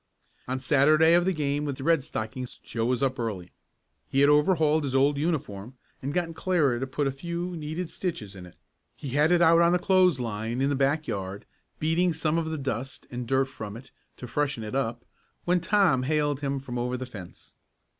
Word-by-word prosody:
On 130 +1 -1
the 130 - -9
Saturday 155 +4 +5
of 175 0 +4
the 190 - +2
game 145 -3 -1
with 140 -3 -3
the 135 - -7
Red 165 -2 +3
Stockings, 125 +2 -5
Joe 115 -1 -4
was 125 +1 0
up 130 -1 0
early. 100 -7 -4 0.6
He 135 - +2
had 140 +1 +6
overhauled 155 0 +3
his 135 -2 -2
old 140 +1 +3
uniform 130 - -3 0.3
and 135 - -3
gotten 165 +1 -1
Clara 160 -8 +1
to 135 - -3
put 140 +2 -2
a 135 - +1
few 170 +5 -4
needed 160 +3 -4
stitches 160 - -5
in 90 -2 -10
it. 90 - -17 0.4
He 140 - -7
had 145 +5 +2
it 175 -1 +5
out 165 0 +6
on 170 +1 +4
the - - +4
clothes 185 -5 +3
line 115 +1 -3
in 135 +1 +1
the - - +1
back 140 +3 +1
yard, 95 0 -5 0.3
beating 165 +3 +1
some 160 +1 0
of 160 -1 -3
the 160 - -3
dust 135 -1 -4
and 120 -1 -5
dirt 135 +2 +2
from 110 -5 -8
it 130 +3 -14 0.3
to - - -8
freshen 140 -1 -2
it 105 - -6
up, 120 -3 -2 0.4
when 180 +1 +3
Tom 175 -7 +3
hailed 145 0 0
him 140 -1 -2
from 125 -2 -5
over 125 +1 -1
the 130 - -5
fence. 100 -8 -11
140 Hz, 215 wpm, -27 LUFS, 125-160 Hz, 0.6 s, had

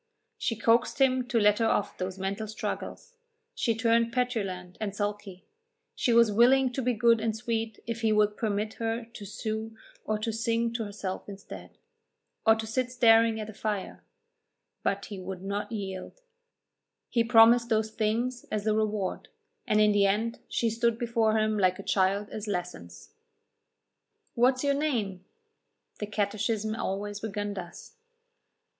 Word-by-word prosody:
She 230 - -1
coaxed 230 +4 +2
him 255 -2 +3
to 240 -2 +1
let 210 0 +4
her 225 - +3
off 205 -2 0
those 185 +1 -3
mental 195 +3 -3
struggles; 470 - -6 0.4
she 245 - 0
turned 230 0 +2
petulant 195 -8 -2
and 205 -2 -3
sulky; 205 -2 -4 0.5
she 245 - 0
was 230 -2 +5
willing 255 +4 +5
to 265 - -2
be 250 0 +1
good 230 0 +4
and 220 -1 -1
sweet 225 -2 -3
if 230 0 -4
he 220 -1 +2
would 210 -1 +3
permit 215 0 -2
her 225 +1 -1
to 225 -3 -11
sew 220 +2 -4 0.3
or 215 - -1
to 220 +1 -3
sing 230 +1 0
to 230 -1 -2
herself 200 -1 -5
instead, 200 0 -10 0.7
or 220 - +7
to 225 0 -4
sit 250 +3 -1
staring 230 -2 +5
at 215 - -4
the 220 - -9
fire: 210 -2 -4 0.8
but 200 0 -1
he 200 -2 -7
would 185 0 -7
not 205 +2 -3
yield; 195 - -6 0.9
he 235 - +3
promised 235 0 +6
those 220 0 +1
things 235 +4 -1
as 210 -1 -1
the 215 0 +2
reward, 215 -3 -1 0.4
and 215 - +3
in 210 0 +5
the 200 -1 +4
end 220 +4 0
she 230 -1 0
stood 230 0 +1
before 230 -2 +1
him 215 -1 +1
like 185 -1 +3
a 195 - -8
child 195 +2 +1
at 215 0 -6
lessons. 175 - -6 1.2
"What 250 +2 +4
is 255 - -5
your 280 0 +3
name?" 230 -11 -1 0.8
The 210 - -3
catechism 215 +1 -1
always 205 -2 -3
began 205 -1 -3
thus. 185 - -9
220 Hz, 160 wpm, -28 LUFS, 205-230 Hz, 1.2 s, or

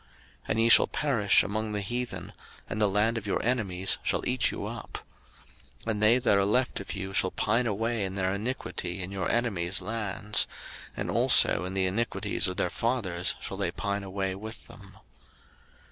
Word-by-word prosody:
03:026:038 - - -30 0.4
And 110 - +1
ye 115 - +3
shall - - +8
perish 125 -10 +3
among 110 +1 -2
the 105 - -1
heathen, 120 +4 -4 0.3
and 110 - -3
the 105 - +4
land 110 +4 +1
of 105 - -11
your 100 - 0
enemies 100 -7 0
shall - - -1
eat - - +2
you - - -5
up. - - -6 0.9
03:026:039 115 - -1
And 105 -1 -3
they 110 +3 +6
that 120 -5 +3
are - - +3
left 125 +5 +1
of 100 - -6
you 95 -1 -5
shall 95 - +3
pine 115 +6 +1
away 115 +1 -1
in 95 0 -4
their 95 -1 0
iniquity 100 -4 -3
in 90 - -7
your 95 -3 -2
enemies' 95 -7 0
lands; 105 0 0 0.5
and - - -2
also 90 - +5
in 95 +1 -5
the 95 -1 +1
iniquities 110 +6 0
of 90 - -4
their 90 - 0
fathers 100 -8 -1
shall 95 - -6
they 100 -3 0
pine 100 +3 -3
away 95 0 -3
with 110 +4 -9
them. 100 -4 -15
100 Hz, 190 wpm, -28 LUFS, 95-115 Hz, 0.9 s, shall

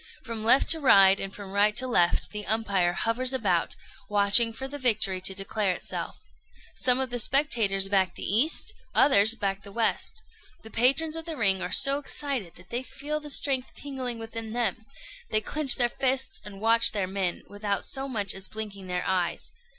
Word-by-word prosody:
From 230 -3 -6
left 245 +5 +5
to 325 - +7
right, 195 -8 +5
and 195 - -4
from 195 -1 -10
right 205 +1 +2
to 260 - +3
left, 180 -9 +1
the 210 -1 -5
umpire 200 -5 0
hovers 245 +6 -1
about, 195 -9 0 0.3
watching 205 +3 +4
for 265 +4 -7
the 290 +2 -8
victory 215 -7 +2
to 190 +1 +1
declare 195 0 0
itself. - - -5 0.6
Some 255 -1 +2
of 260 -2 -3
the 245 - -3
spectators 225 -7 +2
back 195 -2 0
the - - -8
east, 295 - +2 0.2
others 220 -4 +4
back 195 -2 -3
the 200 - -12
west. 225 +2 -2 0.4
The 220 - -11
patrons 275 +7 +2
of 325 0 -3
the 325 -3 -5
ring 195 -5 +1
are 180 0 -4
so 275 +8 +1
excited 275 - -4
that 175 +1 -16
they 240 - -1
feel 295 +3 -5
the 300 -1 -11
strength 270 -2 0
tingling 260 -4 -5
within 225 0 -7
them; 225 -2 -2 0.4
they 215 - +2
clench 285 +5 +4
their 245 - +3
fists, 265 +1 0
and 200 -2 -11
watch 225 +2 +3
their 200 -3 -1
men, 190 -2 -3
without 205 -1 -3
so 270 0 -2
much 205 -7 -2
as 190 0 -3
blinking 205 -3 -8
their 180 0 -3
eyes. 180 -2 -2
220 Hz, 190 wpm, -26 LUFS, 195-260 Hz, 0.6 s, to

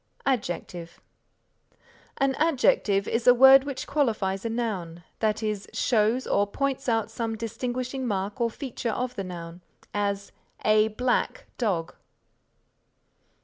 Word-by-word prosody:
ADJECTIVE 175 -8 -3 1.2
An 275 0 +2
adjective 245 -10 +2
is 230 +1 -1
a 245 - +8
word 265 +2 +8
which 280 -2 -4
qualifies 215 -9 0
a 230 - -2
noun, 190 -8 -3 0.2
that 220 0 0
is, 210 -2 -2
shows 230 +1 +2
or 205 0 +2
points 270 +4 -2
out 225 -1 0
some 225 -1 -3
distinguishing 250 +3 -3
mark 205 +3 -2
or 235 - +2
feature 240 -1 -5
of 250 +2 -2
the 195 - -3
noun; 175 -1 -8 0.3
as, 200 -1 -2 0.3
A 215 0 +5
black 250 - -1
dog. 185 -9 -1
225 Hz, 125 wpm, -26 LUFS, 200-255 Hz, 1.2 s, a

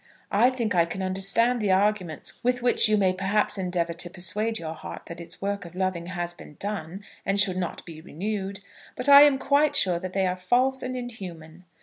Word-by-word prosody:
I 225 +5 +5
think 240 -5 -2
I 170 -2 +4
can 190 +3 -5
understand 195 +6 +1
the 205 -2 +1
arguments 190 -4 0
with 245 0 0
which 245 -2 +4
you 215 - +3
may 190 -2 +3
perhaps 195 +3 0
endeavour 175 -2 -1
to 175 +1 -6
persuade 205 +6 -2
your 160 -3 -5
heart 160 - -9
that 170 0 -8
its 170 +2 -10
work 200 0 -2
of 175 0 -12
loving 185 -2 -2
has 175 -1 -4
been 150 - -14
done, 195 -2 -5 0.2
and 195 +1 +1
should 195 -2 +4
not 180 -2 -4
be 160 -2 -10
renewed; 195 +3 -4 0.3
but - - -2
I 280 0 +10
am 290 -2 +6
quite 285 +2 +2
sure 180 -3 +2
that 185 +1 -6
they 195 -1 +1
are 180 0 0
false 250 +8 +1
and 255 0 -4
inhuman. 180 -9 -8
190 Hz, 210 wpm, -26 LUFS, 175-220 Hz, 0.3 s, I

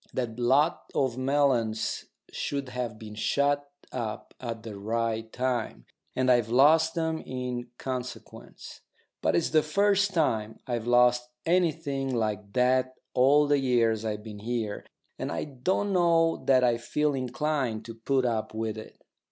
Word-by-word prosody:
That 120 -2 -3
lot 145 +8 +2
of 130 -4 +1
melons 130 -5 +1 0.3
should 140 -2 -3
have 125 -4 -4
been 110 -1 -9
shut 140 +6 0 0.2
up 115 -4 -5
at 115 -3 -5
the 110 -3 -7
right 115 +1 -2
time, 125 -3 -2 0.3
and 130 0 +3
I've 120 -3 +3
lost 160 +7 +5
'em 160 -1 0
in 125 -1 -4
consequence. 125 -1 -7 0.4
But - - +2
it's 170 - +1
the 155 - +5
first 200 +5 +2
time 110 - 0
I've 120 -2 -3
lost 125 0 +4 0.2
anything 145 -6 0
like 105 -3 -2
that 130 +1 +2 0.2
all 140 +4 +5
the 145 0 +3
years 115 -4 +2
I've 105 -1 -3
been 105 -2 -9
here, 110 -1 -3 0.3
and - - -3
I - - -2
don't 185 +9 -1
know 165 -2 +3
that 130 -1 +4
I 120 -2 +3
feel 150 +5 0
inclined 130 -3 -2
to 115 - -7
put 130 +3 0
up 110 -2 -1
with 110 -1 -3
it. 110 - -12
125 Hz, 150 wpm, -28 LUFS, 115-145 Hz, 0.4 s, lost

